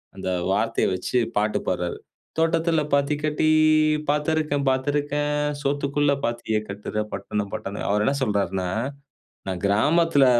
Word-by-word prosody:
அந்த 95 -1 -4 0.2
வார்த்தைய 105 +4 +1
வச்சு, 95 +6 -1 0.2
பாட்டு 105 +1 +1
பாட்றாரு. 90 -1 -1 0.4
"தோட்டத்தில 165 -1 +2
பாத்தி 140 +1 +2
கட்டி. 155 +1 +1 0.6
பாத்திருக்கேன் 150 -1 +1
பாத்திருக்கேன். 145 +2 0 0.3
சோத்துக்குள்ள 145 0 +1
பாத்திய 115 -2 -1
கட்டுற 105 +1 -3
பட்டணம், 100 +1 -3
பட்டணம்." 100 +1 -4
அவரு 105 +1 +2
என்ன 140 - +2
சொல்றார்னா, 95 -5 0 0.8
"நான் 95 -2 -3
கிராமத்ல 145 +8 +4
135 Hz, 115 wpm, -24 LUFS, 100-150 Hz, 0.8 s, கிராமத்ல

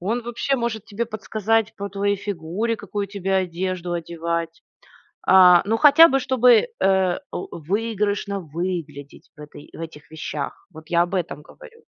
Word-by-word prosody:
Он 225 +7 -2
вообще 240 +4 -1
может 235 -4 -3
тебе 215 +3 -3
подсказать 220 0 -1
по 200 -1 -5
твоей 200 +1 0
фигуре, 200 +3 -3
какую 205 0 -4
тебе 195 -1 -3
одежду 180 -1 -2
одевать. 170 0 -4 0.7
А, 180 -2 +8
ну, 225 +2 +1
хотя 305 +5 +8
бы 270 -3 +1
чтобы, 250 - +4
э, 190 0 +2
выигрышно 205 - -2
выглядеть 160 -4 -6
в - - -22
этой 150 0 -12
в - - -11
этих 160 -2 -9
вещах. 155 -2 -6
Вот 155 0 -13
я 170 0 +3
об 175 - -7
этом 165 -6 -3
говорю. 465 - -16
190 Hz, 150 wpm, -22 LUFS, 170-225 Hz, 0.7 s, А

